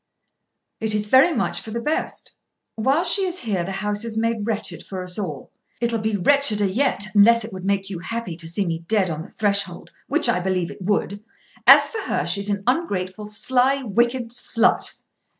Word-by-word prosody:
"It 220 -1 0
is 210 0 -2
very 265 +8 +6
much 260 - -1
for - - -10
the 230 +2 -3
best. 300 +6 -2 0.4
While 270 +9 +1
she 370 +3 +5
is 365 -1 -2
here 200 -7 -1
the 190 - -5
house 210 +1 -1
is 225 -2 -4
made 225 -1 -1
wretched 200 -7 -4
for 185 -2 -6
us 180 +2 -4
all." 155 -9 -6 0.3
"It'll 235 -1 0
be 220 -1 -1
wretcheder 215 -1 +3
yet; 205 +1 0
unless 230 +3 +5
it 220 - -10
would 185 0 -7
make 195 -1 0
you 180 - -5
happy 230 -1 -5
to 165 -2 -8
see 185 +4 -2
me 165 -2 -2
dead 200 -4 +1
on 155 0 -4
the 185 - -10
threshold, 200 -4 -2 0.2
which 300 -1 +4
I 235 -6 +2
believe 180 -1 -1
it - - -12
would. 205 +1 -1 0.4
As - - +9
for 450 - -5
her, - - -2
she's 200 +4 +1
an 200 -1 -2
ungrateful, 210 - -2
sly, 260 +5 +1
wicked 235 +2 0
slut." 235 -1 +1
210 Hz, 195 wpm, -22 LUFS, 190-235 Hz, 0.4 s, As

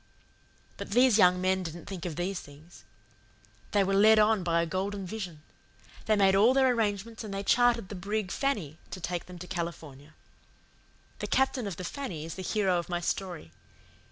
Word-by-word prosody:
"But - - -7
these 245 -2 +5
young 180 -1 +5
men 185 +1 +1
didn't 170 -1 -7
think 185 -3 -6
of 165 - -5
these 180 +2 -2
things; 150 +4 -15 0.9
they 205 -1 +3
were 195 +1 0
led 215 +3 +6
on 215 -1 +4
by 170 -1 +1
a - - -1
golden 195 +3 -3
vision. 180 -6 -6 0.6
They 215 - +4
made 195 -2 +4
all 225 +6 +5
their 265 -1 +4
arrangements, 220 0 -2
and 215 - -7
they 195 0 -3
chartered 240 -2 +3
the - - -6
brig 200 +1 -3
Fanny 195 - -2
to 185 - -7
take 175 0 -4
them 180 -1 -10
to 180 - -8
California. 155 -5 -6 1.0
"The - - -3
captain 265 -4 +1
of 195 - -4
the 185 - -6
Fanny 180 - -5
is 165 - -6
the 190 - -7
hero 190 -2 +1
of 170 - -7
my 175 -1 -1
story. 175 - -4
190 Hz, 185 wpm, -29 LUFS, 175-215 Hz, 1.0 s, led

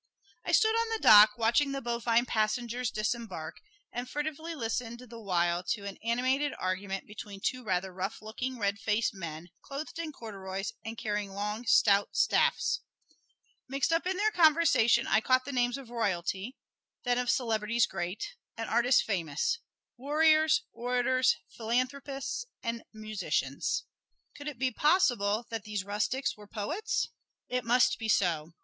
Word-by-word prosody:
I - - -2
stood 440 0 +5
on 460 0 +1
the 450 - 0
dock 210 0 +9
watching 240 +5 +2
the 275 - -2
bovine 235 0 +1
passengers 235 +2 0
disembark, 215 -7 -3 0.3
and 245 +1 -5
furtively 315 +3 -4
listened 235 -2 -3
the 240 -2 -11
while 175 -4 +1
to 205 -3 -7
an 200 -1 -7
animated 260 +5 +1
argument 190 +1 -3
between 205 -1 -9
two 255 +5 -2
rather 190 -2 -1
rough 190 +3 -4
looking, 245 +4 -5
red 200 -2 -1
faced 220 +1 0
men, 170 -2 -7
clothed 290 +4 -6
in 325 -2 -3
corduroys 195 -6 -6
and 225 +1 -6
carrying 210 -2 -2
long, 210 +4 -4
stout 200 -1 +4
staffs. - - +2 0.9
Mixed 275 +4 +1
up 330 +2 +1
in 375 0 -1
their 430 +2 +2
conversation 310 - +4
I 220 - +3
caught 255 +2 +3
the 280 - -4
names 245 -1 +1
of 260 -4 -11
royalty, 200 +1 -2 0.5
then 245 -1 +1
of 250 -1 -1
celebrities 230 -1 +2
great, 180 +2 -4 0.2
and 225 -1 -3
artists 240 +2 +4
famous 215 - -1 0.4
warriors, 310 +3 +4
orators, 250 +1 +2 0.2
philanthropists 270 - -2 0.2
and 230 -1 -2
musicians. 215 -1 -2 0.5
Could 290 0 -9
it 295 -4 -5
be 260 +1 0
possible 240 - +2
that 225 -2 -3
these 210 -2 -3
rustics 210 +6 -1
were 210 -1 -14
poets? 300 - -2 0.4
It 250 0 -1
must 245 +2 +3
be 225 -1 -3
so. 170 -5 +1
235 Hz, 150 wpm, -30 LUFS, 205-260 Hz, 0.9 s, dock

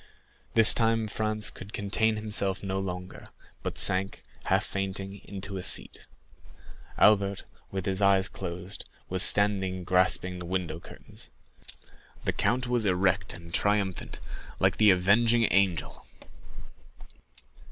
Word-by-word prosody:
This 115 -1 +8
time 115 -1 +1
Franz 110 0 -2
could 100 +3 -12
contain 110 +2 0
himself 100 -3 0
no 95 0 -2
longer, 90 -1 -7 0.3
but - - -5
sank, 95 +1 +1 0.2
half - - +1
fainting, 95 0 -5
into 100 0 -7
a - - -4
seat. - - 0 0.9
Albert, 100 -2 +3 0.3
with 95 -2 -5
his 95 +1 -1
eyes 100 -1 +4
closed, 90 +1 -7 0.3
was 95 0 +1
standing 95 -2 +4
grasping 90 0 +1
the 90 - -6
window 90 -3 -3
curtains. - - -11 1.0
The - - 0
count 125 +1 0
was 120 -2 0
erect 90 0 0
and 85 0 -13
triumphant, 100 -2 -1 0.4
like - - +2
the 105 -1 +5
Avenging 110 +5 +3
Angel! 95 -5 0
95 Hz, 120 wpm, -27 LUFS, 95-105 Hz, 1.0 s, This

